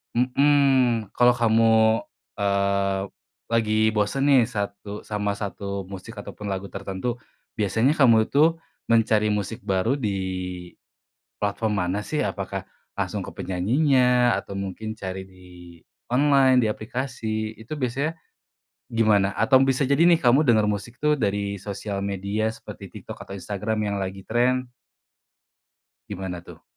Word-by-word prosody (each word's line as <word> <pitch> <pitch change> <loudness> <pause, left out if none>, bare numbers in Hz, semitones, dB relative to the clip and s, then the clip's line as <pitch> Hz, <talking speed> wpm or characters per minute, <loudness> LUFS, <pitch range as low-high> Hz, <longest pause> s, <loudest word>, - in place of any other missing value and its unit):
Mhm. 130 -3 +3
Kalo 125 0 +6
kamu, 115 -1 +3 0.7
eee, 100 -1 +1 0.5
lagi 110 -1 +2
bosen 110 +6 0
nih 130 -4 +6
satu 100 -2 -5
sama 105 -1 -2
1 100 -1 -5
musik 100 +3 -8
ataupun 105 - -9
lagu 95 +1 -5
tertentu, 105 +6 -4 0.4
biasanya 110 - +2
kamu 115 -6 +5
itu 155 +4 +4 0.3
mencari 110 -2 +3
musik 105 +2 -4
baru 100 +8 +1
di 110 -7 -1 1.3
platform 105 +1 -1
mana 95 +4 -2
sih? 150 - -1
Apakah 95 -1 -4 0.2
langsung - - -3
ke - - -9
penyanyinya 125 - +2
atau - - -6
mungkin 100 +3 -5
cari 95 -2 -6
di 95 -1 -18 0.7
online, 135 -1 +5
di 110 - +1
aplikasi, 110 -2 -4
itu 110 +6 -8
biasanya 140 +2 -1 0.8
gimana? 105 -4 +3
Atau 130 +5 +4
bisa 135 0 +1
jadi 140 +4 +3
nih 170 -1 +5
kamu 130 +2 +4
dengar 110 -6 +3
musik 105 +4 -4
tuh 150 +1 +2
dari 100 -5 -1
sosial 100 0 -5
media 100 +3 -1
seperti 110 - -11
TikTok - - -9
atau - - -13
Instagram 100 +3 -3 0.2
yang - - -2
lagi 95 0 -7
tren? 125 +2 +1 1.4
Gimana 95 -3 -5
tuh? - - -14
110 Hz, 130 wpm, -24 LUFS, 100-125 Hz, 1.4 s, Kalo